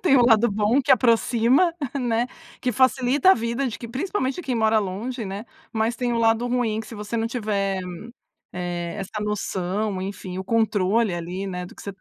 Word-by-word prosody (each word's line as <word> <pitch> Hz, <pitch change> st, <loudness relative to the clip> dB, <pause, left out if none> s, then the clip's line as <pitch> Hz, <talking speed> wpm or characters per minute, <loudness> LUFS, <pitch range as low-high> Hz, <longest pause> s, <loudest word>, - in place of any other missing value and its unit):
Tem 275 Hz, -7 st, +5 dB
o 245 Hz, -, +5 dB
lado 235 Hz, 0 st, +5 dB
bom, 215 Hz, +6 st, +2 dB
que -, -, -2 dB
aproxima, 245 Hz, +6 st, +4 dB, 0.3 s
né, 240 Hz, -1 st, +1 dB, 0.3 s
que 250 Hz, -2 st, 0 dB
facilita 260 Hz, -, +4 dB
a -, -, +7 dB
vida 235 Hz, +4 st, -1 dB
de 225 Hz, -, -6 dB
que 235 Hz, -, -7 dB
principalmente 275 Hz, -, -2 dB
quem 255 Hz, -4 st, -2 dB
mora 220 Hz, -1 st, +3 dB
longe, 215 Hz, +5 st, -3 dB
né. 200 Hz, +3 st, -5 dB, 0.3 s
Mas 225 Hz, +1 st, 0 dB
tem 245 Hz, -1 st, -1 dB
o 230 Hz, -, 0 dB
lado 225 Hz, +1 st, +3 dB
ruim, 240 Hz, -3 st, 0 dB
que 220 Hz, -, -9 dB
se 225 Hz, -, -9 dB
você 210 Hz, +2 st, -4 dB
não 225 Hz, -, 0 dB
tiver, 205 Hz, -5 st, -1 dB, 0.7 s
eh, 175 Hz, -1 st, -4 dB
essa 210 Hz, +2 st, -4 dB
noção, 200 Hz, -1 st, -2 dB
enfim, 185 Hz, -1 st, -6 dB
o 190 Hz, -, -4 dB
controle, 220 Hz, -2 st, +2 dB
ali, 180 Hz, +3 st, -4 dB
né, 180 Hz, -1 st, -4 dB
do -, -, -13 dB
que -, -, -12 dB
você 200 Hz, -, -5 dB
225 Hz, 195 wpm, -24 LUFS, 200-245 Hz, 0.7 s, a